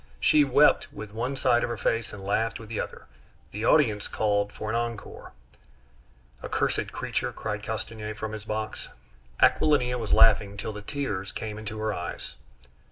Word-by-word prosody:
She 150 - +5
wept 140 +1 +4
with 110 -8 -8
one 125 +5 -2
side 125 -3 +3
of - - -1
her 120 - -3
face, 115 +1 0
and 100 -1 -9
laughed 115 +3 0
with 110 -2 -11
the 110 - -3
other. - - -5 0.5
The 105 +3 -3
audience 110 -8 +3
called 105 -1 +1
for 110 - -6
an 110 - -1
encore. 115 -2 -4 1.1
"Accursed - - -1
creature!" - - -2
cried - - -4
Castanier 110 -1 -5
from 110 0 -4
his 110 -1 -6
box. 110 0 -4 0.5
Aquilina 125 -5 +4
was 110 -3 -4
laughing 100 -2 +5
till 105 +2 -4
the 105 - -7
tears 105 -6 -3
came 110 -1 -5
into 110 0 -6
her 110 0 -1
eyes. 85 -2 -5
110 Hz, 165 wpm, -27 LUFS, 105-120 Hz, 1.1 s, She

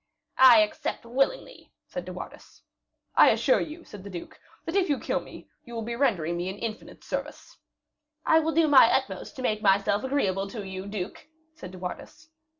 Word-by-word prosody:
"I 250 -4 +9
accept 210 +2 -2
willingly," 275 - -2
said - - -6
De - - -7
Wardes. - - -11 0.5
"I - - +7
assure - - +3
you," 325 +1 -7
said 205 - -12
the 200 - -8
duke, 175 -3 -9 0.3
"that 330 - -4
if 385 -3 +2
you 285 - +2
kill - - -1
me, - - -12 0.2
you 235 - -10
will 225 - -3
be 235 +2 -4
rendering 175 - 0
me 175 +2 -3
an 190 - -6
infinite 220 0 -7
service." - - -6 0.7
"I 320 - +5
will 320 0 0
do 330 -1 +4
my 270 -5 +7
utmost 265 0 -2
to 260 - -7
make 215 -3 0
myself 200 0 +2
agreeable 200 -8 0
to 205 -1 -7
you, 190 0 -6
duke," 200 +3 -6 0.3
said 185 - -10
De 185 - -10
Wardes. 300 - -8
230 Hz, 190 wpm, -27 LUFS, 195-285 Hz, 0.7 s, I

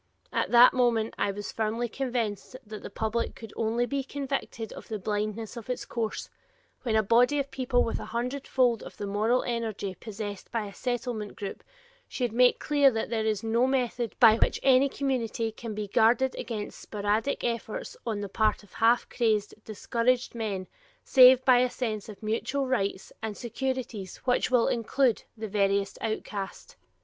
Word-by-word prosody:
At - - 0
that 240 +1 +8
moment 235 -3 +2
I - - +1
was 205 +1 -6
firmly 225 +2 -1
convinced 235 -4 -3
that 215 0 -8
the - - -7
public 220 +3 -2
could 225 -2 -10
only 230 +2 0
be 275 +2 -2
convicted 270 -4 -4
of - - -10
the 220 - -3
blindness 210 +3 -3
of 235 +1 -9
its 250 - -3
course, 225 -2 -3 0.5
when 230 -4 -1
a 220 - +4
body 245 +7 +4
of 280 -1 -2
people 255 -1 +1
with 230 - -2
a - - -6
hundred 250 +4 -3
fold 245 -4 +2
of - - -10
the 205 - -4
moral 215 +5 +1
energy 225 -5 -3
possessed 205 -1 -7
by 230 -3 -1
a 200 - -9
Settlement 240 -4 -3
group, 200 - -6 0.4
should 245 -4 -2
make 245 +1 +5
clear 285 -2 +4
that 225 -2 -3
there 220 -1 0
is 215 -1 0
no 230 +3 +2
method 245 -3 -1
by 225 -3 +8
which - - +1
any 270 +1 +5
community 235 -5 -1
can 220 -1 -7
be 210 -1 -3
guarded 240 +6 +3
against 215 -4 -5
sporadic 210 +5 -1
efforts 230 -2 -3
on 215 -3 -2
the 200 - -3
part 215 +2 +1
of 205 - -20
half 235 +2 +3
crazed, 215 -4 0
discouraged 235 +3 0
men, 210 -5 -3 0.4
save 260 -1 +7
by 255 -2 +6
a 250 0 +3
sense 220 -5 -4
of 210 +1 -11
mutual 235 +6 -1
rights 200 -7 -2
and 220 -2 -4
securities 240 -5 -4
which 250 0 +2
will 250 -2 +3
include 240 +1 +1
the 220 0 -4
veriest 200 -1 0
outcast. 210 -3 -5
230 Hz, 175 wpm, -28 LUFS, 215-250 Hz, 0.5 s, that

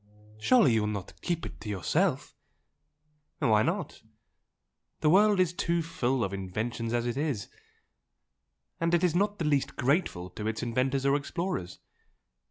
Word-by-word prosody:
"Surely 145 - +5
you 110 - +3
will 105 - 0
not 100 -3 -5
keep 170 -2 -2
it - - -9
to 105 - -6
yourself?" 95 -7 0 1.0
"Why 105 -2 +3
not? - - -2 1.0
The 150 - +4
world 205 +1 +5
is 180 -2 +2
too 170 -1 0
full 130 -6 -1
of 95 - -2
inventions 110 +5 -3
as 120 0 0
it 120 +1 -2
is 140 -9 -2 1.3
and 165 +1 +2
it 170 - +1
is 175 -3 +3
not 205 +3 +1
the 165 - -2
least 145 -3 +1
grateful 130 - 0
to 105 +3 -5
its 110 +2 -2
inventors 130 +3 0
or 140 0 +4
explorers. 145 - -3
135 Hz, 155 wpm, -29 LUFS, 110-170 Hz, 1.3 s, Surely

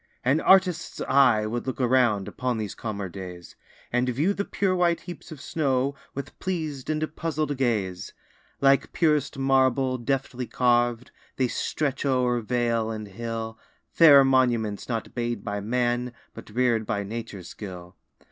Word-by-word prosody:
An 140 +5 +3
artist's 190 -3 +3
eye 125 -6 +4
would 120 +4 -3
look 130 - -3
around, 120 -5 +2
Upon 125 -2 -2
these 105 -3 -4
calmer 100 -3 -4
days, 90 -1 -9 0.4
And 125 +1 +2
view 150 +11 +1
the 200 - -2
pure 195 -2 0
white 170 -2 +2
heaps 175 -1 -10
of 155 - -8
snow, 140 -4 0 0.2
With 140 - -7
pleas'd 155 -8 -3
and 155 0 0
puzzl'd 155 -3 -2
gaze. 105 -9 -1 0.5
Like 140 0 +3
purest 150 -4 +1
marble, 130 -1 +2
deftly 125 0 -2
carv'd, 120 -1 +1 0.2
They 130 - +1
stretch 140 +1 -2
o'er 125 -3 +2
vale 115 -1 0
and 110 -2 -5
hill, 115 +1 -5 0.3
Fair 145 -4 +8
monuments, 120 -6 +1
not 115 -3 -3
made 120 -1 -2
by 105 -2 -3
man, 120 +3 -1 0.2
But - - -11
rear'd 115 -1 +1
by 100 0 -1
nature's 100 -4 -7
skill. 90 -3 -9
125 Hz, 145 wpm, -26 LUFS, 110-140 Hz, 0.5 s, Fair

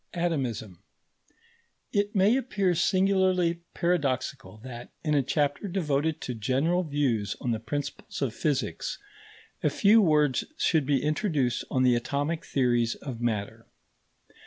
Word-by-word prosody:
ATOMISM 125 - -2 1.1
It 205 0 0
may 200 +5 +4
appear 200 -8 +1
singularly 185 -1 +2
paradoxical 135 - -1
that, 120 -2 -8
in 150 -2 0
a 145 - +4
chapter 145 +7 0
devoted 160 -4 -1
to 125 - -4
general 135 +11 +1
views 140 - 0
on 125 - -2
the 110 - -1
principles 145 +5 -5
of 135 -6 -1
physics, 140 +1 -2 0.6
a - - +2
few 220 +2 +5
words 150 -7 +3
should 160 - +2
be 140 -3 +2
introduced 150 - 0
on 130 - +1
the 125 -1 +5
atomic 140 +7 -2
theories 120 -3 +1
of 125 -5 -7
matter. 110 -4 -2
145 Hz, 130 wpm, -27 LUFS, 125-175 Hz, 1.1 s, few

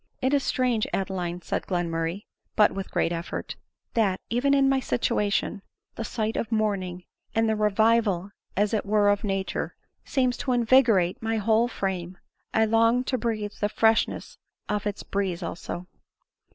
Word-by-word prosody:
"It 260 +2 +1
is 285 - +4
strange, 250 -5 +1
Adeline," 180 -2 -3
said - - -3
Glenmurray, 170 +1 -1 0.3
(but 210 - +5
with 195 0 -5
great 165 - 0
effort,) 170 0 -4 0.2
" - - -54
that, 200 -5 +2
even 275 +4 +3
in 275 -1 +4
my 270 0 +3
situation, 210 -6 0 0.3
the 230 - -5
sight 220 0 -2
of 225 - -2
morning, 195 -5 -1 0.3
and 225 0 +3
the 220 - +2
revival 210 -2 +2 0.3
as 205 +2 +2
it 215 - +1
were 205 0 +3
of 205 0 +1
nature, 195 -2 -2 0.3
seems 255 -2 0
to 255 - -1
invigorate 230 -7 +4
my 225 0 0
whole 220 +2 +3
frame. 185 -5 -3 0.3
I 220 - +3
long 230 +3 +3
to 255 0 -1
breath 215 -3 -3
the 205 - +1
fresh 225 +1 +4
ness - - -9 0.3
of 210 0 -1
its 205 - -4
breeze 190 -3 -2
also." 175 +1 -5
210 Hz, 165 wpm, -26 LUFS, 190-230 Hz, 0.3 s, but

